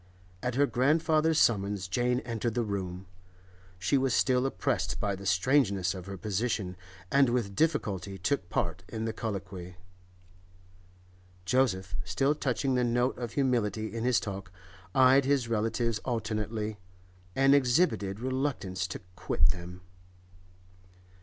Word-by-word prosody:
At 125 Hz, -1 st, -2 dB
her 145 Hz, +2 st, +4 dB
grandfather's 155 Hz, +4 st, +2 dB
summons 100 Hz, -3 st, +2 dB
Jane 125 Hz, +5 st, +1 dB
entered 115 Hz, -1 st, -3 dB
the 120 Hz, -, +1 dB
room. 95 Hz, -3 st, -4 dB, 0.7 s
She 95 Hz, +10 st, +2 dB
was 130 Hz, -2 st, +1 dB
still 130 Hz, 0 st, +3 dB
oppressed 120 Hz, -10 st, -1 dB
by 100 Hz, -3 st, 0 dB
the 100 Hz, 0 st, -7 dB
strangeness 100 Hz, -3 st, +2 dB
of 95 Hz, -1 st, -8 dB
her 100 Hz, 0 st, -6 dB
position, 100 Hz, -1 st, -2 dB, 0.4 s
and 140 Hz, -2 st, +5 dB
with 115 Hz, -5 st, -1 dB
difficulty 100 Hz, -, 0 dB
took 95 Hz, 0 st, -1 dB
part -, -, -2 dB
in 110 Hz, 0 st, -4 dB
the 110 Hz, -, -2 dB
colloquy. 95 Hz, -5 st, -5 dB, 1.7 s
Joseph, 95 Hz, -5 st, +1 dB
still 135 Hz, +12 st, +1 dB
touching 135 Hz, -2 st, -1 dB
the 125 Hz, -1 st, +2 dB
note 120 Hz, +2 st, +1 dB
of 120 Hz, -2 st, -4 dB
humility 110 Hz, -6 st, 0 dB
in 115 Hz, -, -2 dB
his 125 Hz, -1 st, +3 dB
talk, 95 Hz, -3 st, -6 dB, 0.4 s
eyed 130 Hz, +1 st, +6 dB
his 135 Hz, -3 st, +2 dB
relatives 115 Hz, 0 st, 0 dB
alternately, 110 Hz, -2 st, -3 dB, 0.6 s
and 135 Hz, +1 st, +5 dB
exhibited 125 Hz, -, +2 dB
reluctance 125 Hz, -8 st, -2 dB
to 95 Hz, -, -7 dB
quit 75 Hz, -, +1 dB
them. 90 Hz, +1 st, -5 dB
115 Hz, 130 wpm, -29 LUFS, 95-130 Hz, 1.7 s, eyed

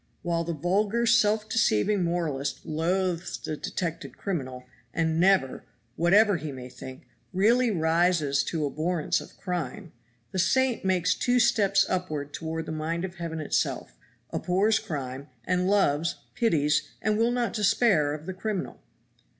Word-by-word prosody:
While 170 Hz, -1 st, 0 dB
the 170 Hz, 0 st, -3 dB
vulgar 200 Hz, +9 st, +1 dB
self 215 Hz, -2 st, +3 dB
deceiving 205 Hz, -, +2 dB
moralist 155 Hz, -5 st, -2 dB
loathes 175 Hz, +2 st, -1 dB
the 155 Hz, -, -5 dB
detected 165 Hz, +2 st, -5 dB
criminal, 130 Hz, -10 st, -4 dB, 0.3 s
and 160 Hz, -1 st, +1 dB
never 185 Hz, -7 st, +3 dB, 0.3 s
(whatever 200 Hz, +4 st, +4 dB
he 155 Hz, -1 st, -5 dB
may 130 Hz, -1 st, -8 dB
think) 130 Hz, +1 st, -10 dB, 0.3 s
really 230 Hz, +6 st, +3 dB
rises 160 Hz, -5 st, +2 dB
to 160 Hz, -3 st, -1 dB
abhorrence 155 Hz, +3 st, -1 dB
of -, -, -14 dB
crime, 175 Hz, -1 st, -4 dB, 0.4 s
the 190 Hz, -, -2 dB
saint 245 Hz, +7 st, +2 dB
makes 180 Hz, -3 st, +2 dB
two 245 Hz, +7 st, +1 dB
steps 200 Hz, -4 st, +3 dB
upward 155 Hz, -6 st, -3 dB
toward 160 Hz, 0 st, -4 dB
the -, -, -5 dB
mind 165 Hz, +3 st, -2 dB
of 190 Hz, 0 st, -8 dB
Heaven 165 Hz, -2 st, -4 dB
itself, 155 Hz, -, -2 dB, 0.4 s
abhors 200 Hz, +5 st, +2 dB
crime, 135 Hz, -2 st, -5 dB, 0.2 s
and 180 Hz, 0 st, +1 dB
loves, 170 Hz, -5 st, +2 dB, 0.2 s
pities, 155 Hz, -11 st, +2 dB, 0.2 s
and 215 Hz, 0 st, +1 dB
will 230 Hz, +2 st, +2 dB
not 245 Hz, -1 st, -1 dB
despair 205 Hz, -8 st, +3 dB
of 155 Hz, +1 st, -10 dB
the 190 Hz, -, -4 dB
criminal. 195 Hz, 0 st, -4 dB
175 Hz, 140 wpm, -27 LUFS, 155-200 Hz, 0.4 s, whatever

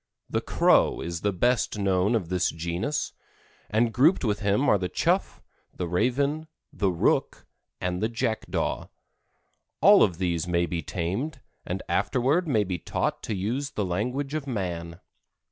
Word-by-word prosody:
The -, -, +1 dB
Crow -, -, +3 dB
is 85 Hz, -1 st, -4 dB
the 105 Hz, -, +1 dB
best 120 Hz, +4 st, +1 dB
known 100 Hz, +2 st, +2 dB
of 95 Hz, -7 st, -2 dB
this 90 Hz, -1 st, +1 dB
genus, 85 Hz, -, -2 dB, 0.6 s
and 115 Hz, +2 st, +2 dB
grouped 145 Hz, -, +4 dB
with 105 Hz, -2 st, 0 dB
him 105 Hz, +6 st, +1 dB
are 100 Hz, -, +4 dB
the 90 Hz, -1 st, -2 dB
chough, -, -, 0 dB, 0.3 s
the 90 Hz, -, -3 dB
raven, 140 Hz, -, 0 dB, 0.3 s
the 100 Hz, -, +1 dB
rook 85 Hz, -2 st, 0 dB, 0.3 s
and 90 Hz, 0 st, -2 dB
the 110 Hz, -, +1 dB
jackdaw. 115 Hz, -1 st, -2 dB, 0.9 s
All -, -, +7 dB
of 85 Hz, -, +3 dB
these 85 Hz, -2 st, -1 dB
may 85 Hz, 0 st, +2 dB
be 85 Hz, -1 st, -3 dB
tamed, 100 Hz, -, -3 dB, 0.3 s
and 95 Hz, +2 st, -3 dB
afterward 130 Hz, -, +1 dB
may 110 Hz, -8 st, +2 dB
be 90 Hz, -3 st, -3 dB
taught -, -, -2 dB
to 110 Hz, -, -3 dB
use 120 Hz, +9 st, -2 dB
the 105 Hz, -, -2 dB
language 125 Hz, +10 st, -2 dB
of 155 Hz, -2 st, -3 dB
man. 85 Hz, -7 st, -4 dB
100 Hz, 155 wpm, -26 LUFS, 90-125 Hz, 0.9 s, All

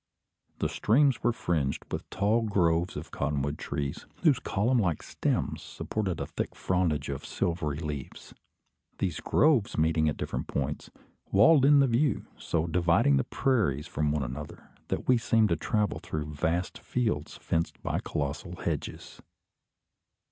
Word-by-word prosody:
The -, -, 0 dB
streams 135 Hz, +4 st, +3 dB
were 120 Hz, -, +3 dB
fringed 80 Hz, -11 st, -1 dB
with -, -, -4 dB
tall 105 Hz, +4 st, +2 dB
groves 90 Hz, -5 st, +1 dB
of -, -, -7 dB
cottonwood 70 Hz, 0 st, -2 dB
trees, 70 Hz, -1 st, -4 dB, 0.2 s
whose 150 Hz, -7 st, +5 dB
column 120 Hz, +5 st, +1 dB
like 85 Hz, -7 st, 0 dB
stems -, -, -1 dB
supported 95 Hz, -6 st, -3 dB
a -, -, -2 dB
thick -, -, -4 dB
frondage 85 Hz, -6 st, 0 dB
of 70 Hz, -1 st, -4 dB
silvery 80 Hz, -4 st, -2 dB
leaves. 75 Hz, -4 st, -6 dB, 0.6 s
These 90 Hz, -6 st, -2 dB
groves 145 Hz, -9 st, +2 dB
meeting 80 Hz, 0 st, +3 dB
at 75 Hz, -, -3 dB
different -, -, -3 dB
points, 70 Hz, -2 st, -3 dB, 0.4 s
walled 130 Hz, +8 st, +6 dB
in 145 Hz, 0 st, +7 dB
the 135 Hz, -, +4 dB
view, 130 Hz, +4 st, +1 dB
so 80 Hz, -1 st, -1 dB
dividing 85 Hz, -4 st, +3 dB
the 65 Hz, -, +2 dB
prairies 95 Hz, -, +1 dB
from 75 Hz, 0 st, -1 dB
one 75 Hz, -2 st, 0 dB
another, 70 Hz, +4 st, -7 dB, 0.2 s
that -, -, -3 dB
we 125 Hz, -2 st, +5 dB
seemed 110 Hz, -1 st, +3 dB
to 85 Hz, -, +3 dB
travel 105 Hz, +6 st, 0 dB
through 75 Hz, -1 st, -5 dB
vast 85 Hz, +5 st, -1 dB
fields 110 Hz, -13 st, -2 dB
fenced 85 Hz, 0 st, -2 dB
by -, -, -1 dB
colossal 70 Hz, -1 st, -3 dB
hedges. -, -, -5 dB
85 Hz, 150 wpm, -29 LUFS, 75-110 Hz, 0.6 s, in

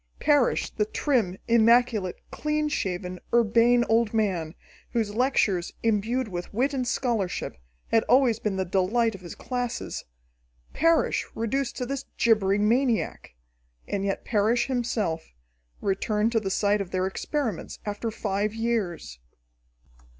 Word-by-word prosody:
Parrish, 290 Hz, -5 st, +2 dB
the 210 Hz, -, 0 dB
trim, 215 Hz, -6 st, 0 dB
immaculate, 230 Hz, -4 st, +4 dB, 0.2 s
clean 300 Hz, 0 st, -1 dB
shaven, 180 Hz, -7 st, -3 dB
urbane 235 Hz, +1 st, +4 dB
old 225 Hz, 0 st, +2 dB
man, 180 Hz, -7 st, 0 dB, 0.4 s
whose 220 Hz, -4 st, 0 dB
lectures, 215 Hz, -7 st, +1 dB
imbued 230 Hz, +3 st, +1 dB
with 175 Hz, -3 st, -6 dB
wit 260 Hz, +7 st, 0 dB
and 255 Hz, -2 st, -1 dB
scholarship, 225 Hz, -8 st, -1 dB, 0.4 s
had 225 Hz, -, +5 dB
always 245 Hz, -2 st, +4 dB
been 210 Hz, -4 st, -1 dB
the 190 Hz, 0 st, -1 dB
delight 205 Hz, +6 st, +1 dB
of 195 Hz, -, -10 dB
his 175 Hz, -2 st, -9 dB
classes 245 Hz, -2 st, -4 dB, 0.7 s
Parrish 330 Hz, 0 st, +2 dB
reduced 235 Hz, +3 st, -2 dB
to 250 Hz, -, -2 dB
this 275 Hz, +2 st, -4 dB
gibbering 210 Hz, -2 st, +3 dB
maniac! 240 Hz, -, 0 dB, 0.5 s
And 200 Hz, -1 st, -2 dB
yet 195 Hz, -1 st, -2 dB
Parrish 225 Hz, +2 st, +2 dB
himself, 225 Hz, -, -2 dB, 0.5 s
returned 210 Hz, +3 st, 0 dB
to 230 Hz, -, +2 dB
the 195 Hz, -3 st, -3 dB
site 205 Hz, +1 st, +1 dB
of 190 Hz, -, -5 dB
their 185 Hz, 0 st, 0 dB
experiments 225 Hz, -, -3 dB
after 205 Hz, +2 st, -3 dB
five 210 Hz, 0 st, -2 dB
years! 200 Hz, -, -2 dB
220 Hz, 130 wpm, -26 LUFS, 195-245 Hz, 0.7 s, had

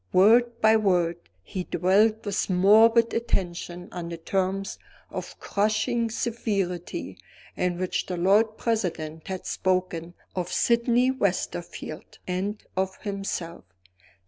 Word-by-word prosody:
Word 235 Hz, +5 st, +5 dB
by 220 Hz, 0 st, +6 dB
word, 175 Hz, -5 st, +2 dB, 0.3 s
he 185 Hz, -, -4 dB
dwelt 210 Hz, +6 st, +2 dB
with 205 Hz, -1 st, -1 dB
morbid 220 Hz, +5 st, +5 dB
attention 180 Hz, -5 st, -2 dB
on 175 Hz, -2 st, -5 dB
the 170 Hz, -, -5 dB
terms 195 Hz, +3 st, -2 dB, 0.3 s
of -, -, -7 dB
crushing 215 Hz, +3 st, 0 dB
severity 205 Hz, -7 st, -3 dB, 0.4 s
in 180 Hz, -1 st, 0 dB
which 185 Hz, 0 st, -2 dB
the 180 Hz, -, -3 dB
Lord 210 Hz, +5 st, +3 dB
President 165 Hz, -8 st, -2 dB
had 190 Hz, -1 st, -5 dB
spoken 180 Hz, -2 st, -1 dB, 0.2 s
of 180 Hz, -1 st, -3 dB
Sydney 240 Hz, +2 st, +3 dB
Westerfield 175 Hz, -8 st, -3 dB
and 195 Hz, +4 st, -2 dB
of 190 Hz, 0 st, -1 dB
himself. 195 Hz, -4 st, -4 dB
190 Hz, 115 wpm, -26 LUFS, 180-220 Hz, 0.4 s, by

